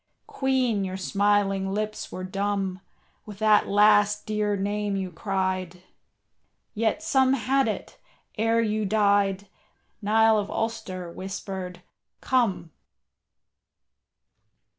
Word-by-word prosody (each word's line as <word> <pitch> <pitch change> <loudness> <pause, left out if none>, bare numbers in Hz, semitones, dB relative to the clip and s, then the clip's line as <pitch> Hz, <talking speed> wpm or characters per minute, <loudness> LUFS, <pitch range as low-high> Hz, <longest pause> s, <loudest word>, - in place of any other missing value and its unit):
Queen, 255 -6 0
your 190 0 -4
smiling 195 0 +1
lips 215 +1 -3
were 185 - -6
dumb 195 -1 -2 0.5
With 205 -2 -9
that 215 0 +4
last 210 0 +4
dear 210 -1 0
name 205 +1 -1
you 190 -2 -3
cried, 185 -1 -3 0.9
Yet 225 +7 0
some 265 -4 +3
had 270 +1 +1
it, 215 - -5 0.4
ere 225 +1 +2
you 215 0 -1
died, 200 -1 +2 0.5
Niall 220 +1 +4
of 205 - -4
Ulster 195 -6 -4
whispered, 185 -1 -6 0.4
"Come." 230 -10 0
205 Hz, 100 wpm, -26 LUFS, 190-220 Hz, 0.9 s, that